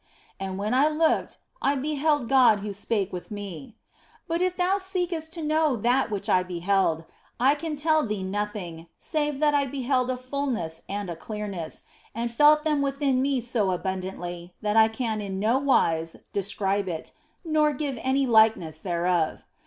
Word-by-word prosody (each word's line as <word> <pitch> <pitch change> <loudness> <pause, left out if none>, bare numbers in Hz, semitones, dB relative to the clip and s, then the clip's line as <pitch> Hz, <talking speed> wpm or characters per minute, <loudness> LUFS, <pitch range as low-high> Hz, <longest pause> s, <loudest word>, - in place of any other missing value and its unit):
And 190 -1 -4
when 210 +4 -1
I 270 +4 +5
looked, 315 +1 +1 0.2
I 280 - +2
beheld 290 -1 0
God 250 -6 +5
who 205 0 -4
spake 200 -1 -2
with 180 - -6
me. 205 +3 -7 0.5
But 335 0 -1
if 365 0 0
thou 375 +2 +2
seekest 355 -4 -2
to 335 -3 -4
know 310 -2 +2
that 245 +4 +2
which 205 -2 -4
I 185 - +4
beheld, 180 -2 0 0.3
I 265 +3 +5
can 305 +1 -4
tell 310 +1 +2
thee 210 -4 -3
nothing, 190 -4 -4
save 295 -3 -1
that 300 -1 +4
I 285 -1 +2
beheld 255 -1 0
a 255 - -1
fulness 255 - -3
and 200 0 -3
a - - -4
clearness, 200 -3 -6 0.3
and 235 +1 -2
felt 300 +5 +5
them 300 -3 +1
within 275 -2 +1
me 270 -2 +1
so 230 -4 0
abundantly 180 -1 -4
that 210 0 0
I 220 0 +7
can 220 -1 -2
in 195 -2 -4
no 225 +6 +2
wise 165 -12 +2 0.2
describe 200 0 -1
it, 160 -2 -5 0.3
nor 310 -2 +3
give 275 -3 -3
any 270 +1 +2
likeness 220 -9 +3
thereof. 175 -2 0
235 Hz, 170 wpm, -26 LUFS, 195-285 Hz, 0.5 s, I